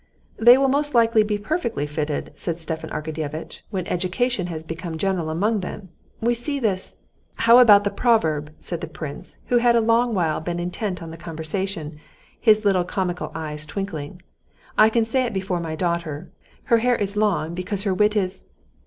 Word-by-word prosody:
"They 240 Hz, +3 st, +8 dB
will 270 Hz, 0 st, +3 dB
most 290 Hz, +1 st, 0 dB
likely 230 Hz, -1 st, +5 dB
be 210 Hz, 0 st, 0 dB
perfectly 235 Hz, -, -2 dB
fitted," 150 Hz, 0 st, -3 dB
said 170 Hz, -2 st, -3 dB
Stepan 160 Hz, -1 st, -5 dB
Arkadyevitch, 155 Hz, 0 st, -5 dB
"when 190 Hz, -4 st, -3 dB
education 185 Hz, +4 st, -1 dB
has 160 Hz, -2 st, -5 dB
become 165 Hz, +1 st, -6 dB
general 180 Hz, -3 st, -1 dB
among 205 Hz, +7 st, +1 dB
them. 185 Hz, +1 st, -7 dB, 0.3 s
We 235 Hz, +2 st, +2 dB
see 280 Hz, +5 st, -3 dB
this...." 200 Hz, -6 st, -2 dB, 0.4 s
"How 230 Hz, +2 st, +6 dB
about 205 Hz, -5 st, +8 dB
the 200 Hz, -, 0 dB
proverb?" 160 Hz, -10 st, +1 dB
said 170 Hz, -2 st, -4 dB
the -, -, -4 dB
prince, 155 Hz, -3 st, -8 dB
who 245 Hz, -, +4 dB
had 240 Hz, 0 st, +4 dB
a -, -, +5 dB
long 230 Hz, +1 st, +2 dB
while 160 Hz, -4 st, 0 dB
been 175 Hz, +2 st, -3 dB
intent 180 Hz, +1 st, -3 dB
on 165 Hz, -, -8 dB
the 165 Hz, -, -9 dB
conversation, 160 Hz, 0 st, -4 dB, 0.4 s
his 215 Hz, -2 st, +4 dB
little 190 Hz, -3 st, +3 dB
comical 180 Hz, -1 st, -3 dB
eyes 155 Hz, -2 st, -5 dB
twinkling. 170 Hz, -1 st, -6 dB, 0.5 s
"I 215 Hz, -, +6 dB
can 225 Hz, 0 st, +2 dB
say 255 Hz, +4 st, +1 dB
it 250 Hz, -, -2 dB
before 190 Hz, -2 st, -1 dB
my 160 Hz, -2 st, -4 dB
daughter: 170 Hz, -2 st, -3 dB, 0.3 s
her 230 Hz, -, +3 dB
hair 245 Hz, +1 st, +2 dB
is 200 Hz, -2 st, -2 dB
long, 200 Hz, -6 st, +1 dB
because 185 Hz, +3 st, -3 dB
her 195 Hz, -3 st, +1 dB
wit 210 Hz, +3 st, +2 dB
is...." 190 Hz, -3 st, -1 dB
185 Hz, 180 wpm, -23 LUFS, 165-225 Hz, 0.5 s, They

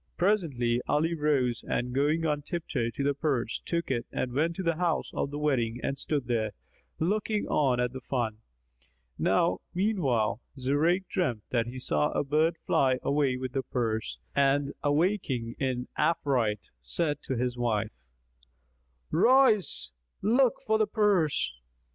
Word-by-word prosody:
Presently, 140 Hz, -, +1 dB
Ali 160 Hz, +3 st, +2 dB
rose 145 Hz, -6 st, +1 dB
and 125 Hz, +1 st, -2 dB
going 150 Hz, +5 st, +1 dB
on 150 Hz, -2 st, 0 dB
tiptoe 145 Hz, -7 st, -2 dB
to 115 Hz, +5 st, -4 dB
the 140 Hz, +1 st, +2 dB
purse, 135 Hz, -5 st, -1 dB
took 170 Hz, -4 st, -1 dB
it 120 Hz, -2 st, -1 dB
and 125 Hz, -, -2 dB
went 160 Hz, +5 st, +1 dB
to 190 Hz, -, -4 dB
the 165 Hz, -2 st, 0 dB
house 170 Hz, -2 st, 0 dB
of -, -, -1 dB
the 145 Hz, -, -5 dB
wedding 125 Hz, -6 st, 0 dB
and 135 Hz, -, -1 dB
stood 140 Hz, -1 st, -2 dB
there, 110 Hz, -3 st, -1 dB, 0.4 s
looking 210 Hz, +5 st, 0 dB
on 130 Hz, -5 st, +2 dB
at 125 Hz, 0 st, 0 dB
the 130 Hz, -, -6 dB
fun. 120 Hz, -4 st, -2 dB, 0.8 s
Now 90 Hz, -, +2 dB, 0.2 s
meanwhile, 140 Hz, -, +1 dB, 0.2 s
Zurayk 155 Hz, +8 st, +1 dB
dreamt 125 Hz, -, -1 dB
that 120 Hz, -2 st, +1 dB
he 125 Hz, +2 st, -7 dB
saw 75 Hz, -12 st, +1 dB
a -, -, +1 dB
bird 155 Hz, +4 st, +2 dB
fly 130 Hz, -2 st, +3 dB
away 140 Hz, -3 st, +1 dB
with 130 Hz, -1 st, -4 dB
the 135 Hz, -, 0 dB
purse 115 Hz, -4 st, -2 dB, 0.2 s
and 140 Hz, 0 st, +2 dB
awaking 145 Hz, -, 0 dB
in 130 Hz, -2 st, -1 dB
affright, 135 Hz, -9 st, 0 dB
said 145 Hz, -, -1 dB
to 130 Hz, -, -2 dB
his 125 Hz, 0 st, -1 dB
wife, 110 Hz, -3 st, 0 dB, 1.2 s
"Rise; 245 Hz, -, +3 dB, 0.3 s
look 240 Hz, +3 st, +4 dB
for 220 Hz, 0 st, +2 dB
the 215 Hz, -, +3 dB
purse." 195 Hz, -, +2 dB
140 Hz, 150 wpm, -28 LUFS, 120-165 Hz, 1.2 s, look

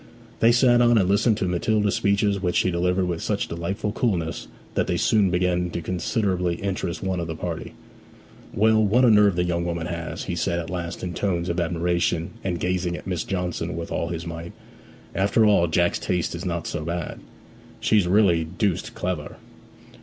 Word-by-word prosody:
They 115 Hz, -, +5 dB
sat 120 Hz, 0 st, +5 dB
on, 120 Hz, -1 st, +5 dB
and 95 Hz, -4 st, +3 dB
listened 105 Hz, +3 st, +3 dB
to 95 Hz, -, -1 dB
Matilda's 105 Hz, +3 st, +1 dB
speeches 100 Hz, -1 st, +1 dB
which 90 Hz, -2 st, -1 dB
she 90 Hz, -, +2 dB
delivered 90 Hz, +2 st, +1 dB
with 85 Hz, -2 st, -3 dB
such 105 Hz, -2 st, -1 dB
delightful 85 Hz, +5 st, -3 dB
coolness 90 Hz, -8 st, -1 dB, 0.3 s
that -, -, 0 dB
they -, -, 0 dB
soon 105 Hz, -3 st, +3 dB
began 90 Hz, 0 st, +1 dB
to 85 Hz, -, -4 dB
considerably 90 Hz, 0 st, -1 dB
interest 90 Hz, -3 st, -3 dB
one 95 Hz, -1 st, -1 dB
of 85 Hz, -, -3 dB
the 80 Hz, -, -4 dB
party. 85 Hz, 0 st, -5 dB, 0.8 s
'Well, 110 Hz, +1 st, +3 dB
what 115 Hz, +5 st, +4 dB
a 120 Hz, -, +6 dB
nerve 105 Hz, -3 st, +5 dB
the 90 Hz, -, +1 dB
young 85 Hz, -1 st, -1 dB
woman 85 Hz, -1 st, -3 dB
has!' 85 Hz, -1 st, -5 dB
he 90 Hz, -, -4 dB
said 85 Hz, 0 st, 0 dB
at 85 Hz, 0 st, -4 dB
last 85 Hz, -1 st, -5 dB
in 90 Hz, -1 st, -3 dB
tones 90 Hz, -2 st, -1 dB
of 85 Hz, +1 st, -1 dB
admiration, 85 Hz, 0 st, 0 dB
and 90 Hz, -3 st, -2 dB
gazing 90 Hz, 0 st, -1 dB
at -, -, -11 dB
Miss 90 Hz, -4 st, -2 dB
Johnson 90 Hz, -4 st, -3 dB
with 85 Hz, -, -5 dB
all 85 Hz, -, -1 dB
his 85 Hz, 0 st, -5 dB
might. 85 Hz, 0 st, -7 dB, 0.6 s
'After 100 Hz, +3 st, +3 dB
all, 100 Hz, -5 st, +4 dB
Jack's 85 Hz, +2 st, +1 dB
taste 90 Hz, -2 st, -1 dB
is 85 Hz, +3 st, -6 dB
not 85 Hz, -2 st, -2 dB
so -, -, -3 dB
bad. 85 Hz, 0 st, -4 dB, 0.6 s
She's 105 Hz, -5 st, +3 dB
really 90 Hz, -4 st, +4 dB
deuced 95 Hz, +3 st, -2 dB
clever.' 90 Hz, -5 st, -4 dB
90 Hz, 190 wpm, -24 LUFS, 85-100 Hz, 0.8 s, a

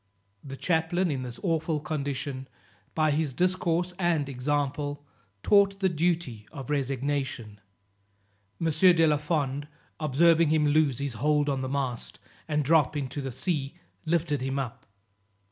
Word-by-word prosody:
The 135 Hz, -1 st, -8 dB
chaplain, 175 Hz, +2 st, +1 dB
in 135 Hz, -3 st, -2 dB
this 125 Hz, -1 st, -5 dB
awful 165 Hz, -3 st, 0 dB
condition, 140 Hz, -3 st, -4 dB, 0.5 s
by 155 Hz, -1 st, +3 dB
his 145 Hz, -3 st, -1 dB
discourse 180 Hz, -1 st, +1 dB
and 170 Hz, -5 st, +1 dB
example, 145 Hz, +2 st, -2 dB, 0.4 s
taught 200 Hz, -1 st, +4 dB
the 190 Hz, -1 st, +2 dB
duty 160 Hz, -10 st, -1 dB
of 140 Hz, -2 st, -7 dB
resignation. 135 Hz, -6 st, -2 dB, 1.0 s
M. 165 Hz, -1 st, +1 dB
de 165 Hz, +1 st, +5 dB
la 150 Hz, -1 st, +3 dB
Fond 145 Hz, -2 st, -2 dB, 0.3 s
observing 160 Hz, +2 st, +4 dB
him 155 Hz, -1 st, +3 dB
lose 145 Hz, -3 st, +3 dB
his 140 Hz, -3 st, -3 dB
hold 150 Hz, +5 st, +1 dB
on 135 Hz, -2 st, -1 dB
the 130 Hz, -, -3 dB
mast, 130 Hz, -4 st, -3 dB, 0.3 s
and 150 Hz, -1 st, 0 dB
drop 155 Hz, 0 st, +3 dB
into 140 Hz, 0 st, -3 dB
the 135 Hz, -1 st, -4 dB
sea, 145 Hz, +1 st, -2 dB, 0.3 s
lifted 160 Hz, -4 st, 0 dB
him 135 Hz, +1 st, -2 dB
up. 130 Hz, -4 st, -5 dB
150 Hz, 140 wpm, -27 LUFS, 135-165 Hz, 1.0 s, de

